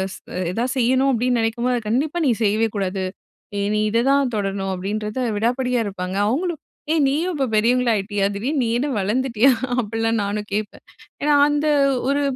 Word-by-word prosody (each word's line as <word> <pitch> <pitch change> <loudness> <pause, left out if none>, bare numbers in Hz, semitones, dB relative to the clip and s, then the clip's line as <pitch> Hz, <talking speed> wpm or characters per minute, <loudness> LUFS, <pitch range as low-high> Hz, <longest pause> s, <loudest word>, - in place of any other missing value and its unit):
ஸ் - - -12 0.3
எதாவது 245 +5 -1
செய்யணும் 260 +3 +3
அப்படின்னு 245 +1 +1
நெனைக்கும்போது 235 +2 0
"அது 215 - -10
கண்டிப்பா 285 +8 0
நீ - - +4
செய்யவே 215 +2 +2
கூடாது, 190 -1 -2 0.5
நீ 200 - -2
நீ - - +1
இததான் 265 +3 +2
தொடரணும்." 195 -2 -2
அப்படின்றத 210 +5 -3 0.2
விடாப்பிடியா 250 +3 0
இருப்பாங்க. 185 -2 -4
அவங்களும் 330 +5 -2 0.3
"ஏய் 315 -3 +3
நீயும் 320 +7 0
இப்ப 275 -2 0
பெரியவங்களாயிட்டீயா? 215 -3 +2
திடீர்னு 265 +8 -1
நீ - - 0
என்ன 280 +4 -1
வளர்ந்துட்டீயா?" 240 +4 +2 0.3
அப்படிலாம் 225 0 -1
நானும் 205 +1 -3
கேட்பேன். 210 0 -4 0.4
ஏன்னா 295 +1 +3 0.2
அந்த 295 +1 0 0.4
ஒரு 285 +1 +1
230 Hz, 155 wpm, -21 LUFS, 210-265 Hz, 0.5 s, நீ